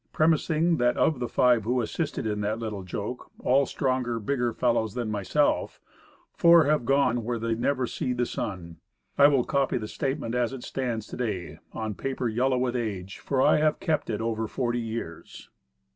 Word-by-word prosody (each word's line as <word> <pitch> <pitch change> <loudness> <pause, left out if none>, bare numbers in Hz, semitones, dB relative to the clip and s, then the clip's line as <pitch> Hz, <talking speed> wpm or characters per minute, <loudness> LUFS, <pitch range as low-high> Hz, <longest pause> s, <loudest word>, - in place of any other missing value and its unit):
Premising 160 +1 +2
that 120 -1 +2
of 155 -5 +2
the 120 - -2
five 125 -3 +3
who 125 +4 0
assisted 145 +5 -2
in 105 -1 -1
that 105 +2 -1
little 110 -3 -4
joke, 100 +6 -6
all 135 +2 +3
stronger, 130 -3 -1
bigger 120 +1 0
fellows 115 -3 0
than 120 -3 -2
myself, 105 +9 0 0.5
four 170 -1 +6
have 145 -3 +1
gone 125 -3 +2
"where 120 +1 -2
they 115 0 -1
never 130 +3 0
see 125 - -3
the 125 0 0
sun," 90 -8 -5 0.4
I 140 - +7
will 140 -4 +3
copy 140 -2 0
the 110 -3 -4
statement 135 0 -3
as 125 0 0
it 130 -2 -7
stands 120 -5 -3
to - - -9
day, 100 -8 -4
on 110 -1 -4
paper 130 +3 -3
yellow 125 +4 +1
with 125 0 0
age. 100 -5 -4
For 135 -2 0
I - - +5
have 155 0 +2
kept 160 -4 -1
it 110 -1 -2
over 110 -1 -1
forty 120 +1 -1
years. 110 -8 -7
120 Hz, 185 wpm, -27 LUFS, 110-135 Hz, 0.5 s, I